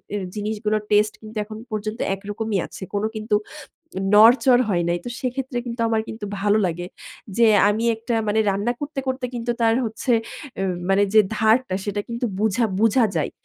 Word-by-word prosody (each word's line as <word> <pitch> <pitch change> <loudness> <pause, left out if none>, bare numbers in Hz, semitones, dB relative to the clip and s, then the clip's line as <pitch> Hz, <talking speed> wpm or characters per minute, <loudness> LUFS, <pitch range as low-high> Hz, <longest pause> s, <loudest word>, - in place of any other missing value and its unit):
এ - - 0 0.2
জিনিসগুলোর 215 0 -1
টেস্ট 210 +1 +4
কিন্তু 220 0 -9
এখন 215 0 -9
পর্যন্ত 215 +2 -4 0.2
একরকমই 205 +2 -3
আছে। - - -11
কোন 205 0 -1
কিন্তু 215 0 0 0.8
নড়চড় 245 +4 +6
হয় 175 -4 +1
নাই। 175 0 +1
তো - - -4
সেক্ষেত্রে 255 0 -3
কিন্তু 235 0 -5
আমার 225 -1 +1
কিন্তু 220 -1 -6 0.2
ভালো 205 +1 +3
লাগে। 175 0 -4 0.5
যে 235 - +5 0.2
আমি 215 +2 0
একটা 230 +2 -3
মানে 215 +1 +2
রান্না 200 +5 0
করতে 290 -1 -4
করতে 260 -1 -2
কিন্তু 240 0 -2
তার 225 0 +4
হচ্ছে, 225 +3 -2 0.5
এ - - 0 0.3
মানে 195 +1 +4
যে 215 - +9 0.2
ধারটা 220 0 +3
সেটা 205 0 -2
কিন্তু 235 +1 -2
বুঝা 220 +3 +1 0.2
বুঝা 225 +2 +4
যায়। 155 - 0
220 Hz, 175 wpm, -22 LUFS, 205-235 Hz, 0.8 s, যে